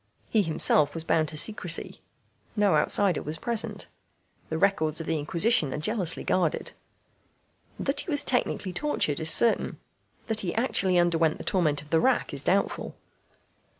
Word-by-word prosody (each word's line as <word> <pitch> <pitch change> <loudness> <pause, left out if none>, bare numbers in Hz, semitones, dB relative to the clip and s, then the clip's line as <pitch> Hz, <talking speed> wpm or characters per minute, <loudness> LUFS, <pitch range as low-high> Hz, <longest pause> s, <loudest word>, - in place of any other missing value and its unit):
He 220 - +3
himself 155 -3 +3
was 165 - -4
bound 160 -1 0
to 155 - -6
secrecy. 180 -2 +1 0.5
No 205 -3 +2
outsider 200 -5 +2
was 155 +2 -5
present. 230 +6 -3 0.6
The 160 - -3
records 160 -5 0
of 165 - -5
the 160 -1 -2
Inquisition 170 - +1
are - - -4
jealously 180 +1 0
guarded. 175 -4 -1 1.1
That - - -1
he - - -2
was 290 -2 +1
technically 205 -6 -2
tortured 175 - 0
is 160 0 +4
certain; 235 +6 +3 0.5
that 220 -2 -2
he 180 -5 -3
actually 195 -6 +2
underwent 165 -2 +1
the - - -9
torment 155 -7 0
of 150 - -20
the 165 - +3
rack 265 - 0
is - - -3
doubtful. - - -1
175 Hz, 155 wpm, -26 LUFS, 155-210 Hz, 1.1 s, is